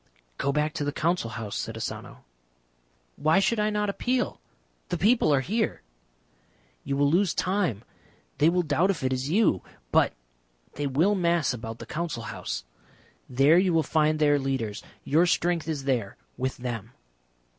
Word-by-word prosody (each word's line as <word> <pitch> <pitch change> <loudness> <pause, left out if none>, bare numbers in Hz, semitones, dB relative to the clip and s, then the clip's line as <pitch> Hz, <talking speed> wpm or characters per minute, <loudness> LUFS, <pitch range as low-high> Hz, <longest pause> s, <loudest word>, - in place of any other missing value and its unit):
"Go 140 - +1
back 150 +1 0
to 165 - -2
the 145 - -1
Council 165 -5 0
House," 110 -3 -5
said - - -4
Asano. - - -6 0.9
"Why 155 +4 +3
should 210 +3 +2
I 210 0 +2
not 210 0 0
appeal? 250 +5 -1 0.5
The - - -1
people 220 -5 +3
are 140 -2 +4
here." 215 - -1 1.0
"You 140 0 -2
will 145 0 +3
lose 180 0 +2
time. 180 - 0 0.6
They 150 +2 +6
will 180 +1 +1
doubt 165 +5 +2
if 175 -8 -1
it 130 0 +1
is 130 +2 -2
you. 190 - +3 0.3
But - - +4 0.6
they 145 0 -2
will 160 +10 +2
mass 170 -7 +1
about 115 -1 -6
the - - -9
Council 155 -8 -4
House. 100 - -5 0.7
There 140 +7 +5
you 185 -2 +2
will 160 - +3
find 155 0 +2
their 145 -1 +3
leaders. 130 -6 -2 0.2
Your 165 +5 +3
strength 170 -2 +1
is 150 -4 -3
there 120 -7 -1 0.2
with 130 +1 -2
them." 120 -3 -5
150 Hz, 165 wpm, -27 LUFS, 130-180 Hz, 1.0 s, They